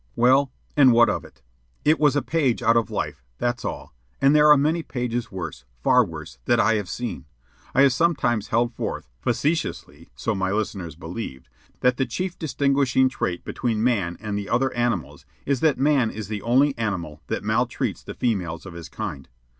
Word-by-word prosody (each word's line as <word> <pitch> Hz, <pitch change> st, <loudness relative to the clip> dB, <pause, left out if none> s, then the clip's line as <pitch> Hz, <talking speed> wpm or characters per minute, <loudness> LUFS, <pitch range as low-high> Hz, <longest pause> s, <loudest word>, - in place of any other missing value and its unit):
Well, 130 Hz, +3 st, +4 dB, 0.2 s
and 135 Hz, -4 st, +7 dB
what 120 Hz, -1 st, +6 dB
of -, -, -3 dB
it? 65 Hz, -, -18 dB, 0.4 s
It 155 Hz, +2 st, +4 dB
was 145 Hz, -2 st, +4 dB
a 145 Hz, -, +1 dB
page 135 Hz, -7 st, 0 dB
out 115 Hz, 0 st, +4 dB
of 115 Hz, -1 st, +2 dB
life, 70 Hz, -3 st, -4 dB
that's 120 Hz, -, -1 dB
all; -, -, -5 dB, 0.3 s
and 140 Hz, +2 st, +4 dB
there 150 Hz, 0 st, +6 dB
are 150 Hz, -, +8 dB
many 155 Hz, +4 st, +1 dB
pages 120 Hz, -5 st, -3 dB
worse, 85 Hz, -8 st, -6 dB, 0.2 s
far -, -, +5 dB
worse, -, -, -9 dB
that -, -, +3 dB
I 115 Hz, -, +4 dB
have 105 Hz, -4 st, -2 dB
seen. 120 Hz, -3 st, -5 dB, 0.5 s
I 135 Hz, -, +6 dB
have 135 Hz, -2 st, +5 dB
sometimes 125 Hz, -8 st, +1 dB
held 120 Hz, +1 st, +1 dB
forth -, -, -4 dB
(facetiously, 150 Hz, +7 st, -2 dB
so 110 Hz, -, -1 dB
my 95 Hz, -2 st, -1 dB
listeners 95 Hz, -6 st, -3 dB
believed) 80 Hz, -, -7 dB, 0.3 s
that 125 Hz, -1 st, +3 dB
the 135 Hz, -, 0 dB
chief 180 Hz, +9 st, -4 dB
distinguishing 140 Hz, -4 st, +2 dB
trait 90 Hz, -9 st, -3 dB
between 115 Hz, -3 st, -1 dB
man 100 Hz, -9 st, +1 dB
and 105 Hz, -2 st, -4 dB
the 100 Hz, -1 st, -4 dB
other 130 Hz, +3 st, +1 dB
animals 120 Hz, -, -2 dB, 0.2 s
is 140 Hz, -2 st, +1 dB
that 155 Hz, -1 st, +3 dB
man 135 Hz, -3 st, +3 dB
is 105 Hz, -2 st, -7 dB
the 105 Hz, -2 st, -3 dB
only 135 Hz, +5 st, +3 dB
animal 85 Hz, -9 st, -3 dB
that -, -, -3 dB
maltreats -, -, -1 dB
the -, -, -9 dB
females 90 Hz, -9 st, -2 dB
of 95 Hz, -, -8 dB
his 85 Hz, -2 st, -9 dB
kind. 70 Hz, -1 st, -6 dB
120 Hz, 185 wpm, -24 LUFS, 100-135 Hz, 0.5 s, are